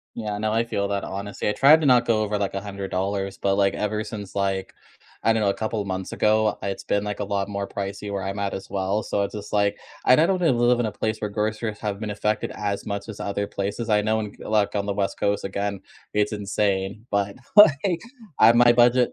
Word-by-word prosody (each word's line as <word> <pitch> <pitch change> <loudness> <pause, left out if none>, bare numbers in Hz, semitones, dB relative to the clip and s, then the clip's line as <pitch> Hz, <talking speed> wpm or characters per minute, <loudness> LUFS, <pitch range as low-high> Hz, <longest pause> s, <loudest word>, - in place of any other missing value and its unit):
Yeah. 105 -2 -3
No, 110 0 -1
I 115 +1 +2
feel 100 -3 -2
that 100 -1 -1
honestly. 100 +1 -4
I - - +2
tried 150 +7 +6
to 150 - +1
not 125 -2 +5
go 110 -2 +2
over, 105 0 -1
like, 100 -1 -2
$100, 100 0 -3
but, 100 0 0
like, 100 -1 +2
ever 105 +1 -2
since, 105 -3 -8
like, 95 -1 -1 0.5
I 115 - +5
don't 110 -1 0
know, 100 - +2
a 100 - +1
couple 110 -1 -2
months 95 -1 -4
ago, 110 0 +2
it's 100 -1 -4
been, 100 - 0
like, 105 -1 -4
a 105 - -2
lot 100 0 -2
more 100 -1 -3
pricey 100 +1 -5
where 100 -1 -2
I'm 100 +1 -4
at 100 -1 -2
as 95 - -7
well. 100 +2 -1
So 100 - -1
it's 100 - -3
just, 105 -1 -7
like, 100 0 +2 0.3
and 130 +4 +6
I 165 - +5
don't 185 -1 0
live 120 -6 +3
in 115 - +1
a 105 - -3
place 110 +2 -2
where 105 - -3
groceries 110 +1 -2
have 105 -2 -3
been 110 -1 -4
affected 105 +1 -1
as 100 0 -3
much 100 +1 -4
as 105 - -7
other 100 0 -2
places. 105 +4 -3
I 105 -1 +3
know 110 +1 +1
in 105 -2 -5
g - - -12
like, 105 -1 +1
on 100 0 -1
the 100 - 0
West 100 -1 -2
Coast, 100 0 0
again, 100 0 -3 0.3
it's 105 0 +1
insane. 100 +1 -1
But, 100 -1 0 0.2
like, 175 -2 +6 0.4
I 110 - +7
have 115 +1 +6
my 120 0 +7
budget. 120 +1 +4
105 Hz, 240 wpm, -24 LUFS, 100-110 Hz, 0.5 s, I